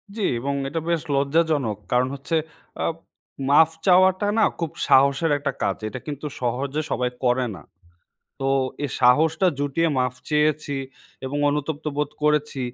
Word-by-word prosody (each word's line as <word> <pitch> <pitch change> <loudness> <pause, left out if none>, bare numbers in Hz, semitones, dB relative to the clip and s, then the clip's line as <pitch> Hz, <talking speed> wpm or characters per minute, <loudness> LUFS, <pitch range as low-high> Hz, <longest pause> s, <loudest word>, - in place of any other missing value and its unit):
জি 225 - -4 0.2
এবং 140 +3 -2 0.2
এটা 165 +3 -2
বেশ 170 -2 +1
লজ্জাজনক। 140 -5 +1
কারণ 125 +1 +3
হচ্ছে, 140 +4 -3 0.5
আ - - 0 0.6
মাফ 155 +3 +6 0.2
চাওয়াটা 185 +1 +5
না 220 - +4 0.2
খুব 165 -3 -2 0.2
সাহসের 140 +4 +4
একটা 140 -1 -2
কাজ। - - 0
এটা 130 +4 -6
কিন্তু 145 0 -5 0.2
সহজে 135 +5 -1
সবাই 125 -1 0
করে 125 0 +2
না। 85 - -11 0.8
তো - - -3 0.4
এই 145 - -2
সাহসটা 155 +8 +4
জুটিয়ে 145 +4 +1
মাফ 125 -1 0 0.2
চেয়েছি 150 -1 +1 0.5
এবং 135 +2 -3
অনুতপ্ত 150 +1 -2
বোধ 150 -1 -1
করেছি, 150 -2 +1
145 Hz, 145 wpm, -23 LUFS, 135-160 Hz, 0.8 s, মাফ